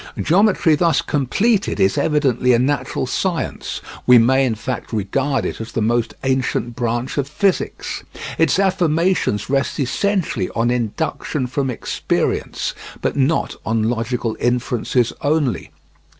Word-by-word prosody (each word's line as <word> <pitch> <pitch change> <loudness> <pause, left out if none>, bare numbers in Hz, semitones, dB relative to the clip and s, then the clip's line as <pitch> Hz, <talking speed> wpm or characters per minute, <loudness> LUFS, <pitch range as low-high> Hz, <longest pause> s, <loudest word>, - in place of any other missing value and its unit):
Geometry 185 -2 +3
thus 165 +2 +3
completed 195 - +1
is 95 - +3
evidently 135 -5 +2
a - - +5
natural 130 0 0
science; 170 +6 -2 0.3
we 125 -1 +8
may 130 +3 +4
in 115 - -1
fact 120 +3 -5
regard 130 +6 0
it - - -4
as 115 - -8
the - - -1
most 115 0 0
ancient 130 -2 0
branch 120 +3 -2
of 140 - -1
physics. 185 +6 -1 0.4
Its 165 0 +3
affirmations 180 - +1
rest 135 +3 0
essentially 150 - 0
on 115 +1 +2
induction 125 +4 -2
from 135 +1 -2
experience, 125 - -2 0.3
but - - -1
not 140 +4 +1
on 110 0 0
logical 115 -1 -2
inferences 120 0 0
only. 145 -4 0
130 Hz, 130 wpm, -20 LUFS, 120-160 Hz, 0.4 s, we